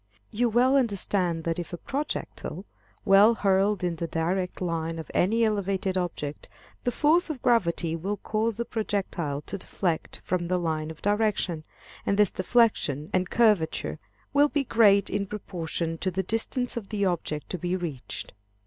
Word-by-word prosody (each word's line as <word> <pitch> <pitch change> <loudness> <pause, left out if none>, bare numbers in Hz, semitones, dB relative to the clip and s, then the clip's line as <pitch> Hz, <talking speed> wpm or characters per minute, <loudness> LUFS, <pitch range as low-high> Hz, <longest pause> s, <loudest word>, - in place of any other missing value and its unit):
You 240 +2 +1
well 250 +4 +4
understand 195 -8 0
that 165 +1 -1
if 175 - -6
a - - -3
projectile 280 - -4 0.4
be - - +1 0.2
hurled 195 -1 +2
in 175 -2 -1
the 170 - -3
direct 175 +3 -1
line 165 -2 -2
of 160 - -7
any 225 +6 +3
elevated 195 -3 0
object, 160 -5 -3 0.4
the 245 - +2
force 320 +7 +3
of 285 -6 -5
gravity 170 -9 +2
will 195 +5 -3
cause 215 +2 -1
the 235 - -2
projectile 195 -10 -2
to 200 +6 -6
deflect 175 -3 -2
from 175 -1 -1
the 180 +1 +1
line 160 -3 -2
of 160 - -10
direction, 205 -6 +1 0.4
and 200 - 0
this 210 -3 +4
deflection 185 - +1
and 185 0 +1
curvature 210 -9 +2 0.3
will 290 +1 +5
be 290 -1 0
great 205 -5 +4
in 200 0 -1
proportion 165 -5 -3
to 185 - 0
the 190 +1 -2
distance 225 +5 0
of 220 -5 -5
the 205 -2 0
object 160 -4 -2
to 180 - -3
be 180 +2 -1
reached. 160 -9 -6
190 Hz, 165 wpm, -27 LUFS, 170-220 Hz, 0.4 s, will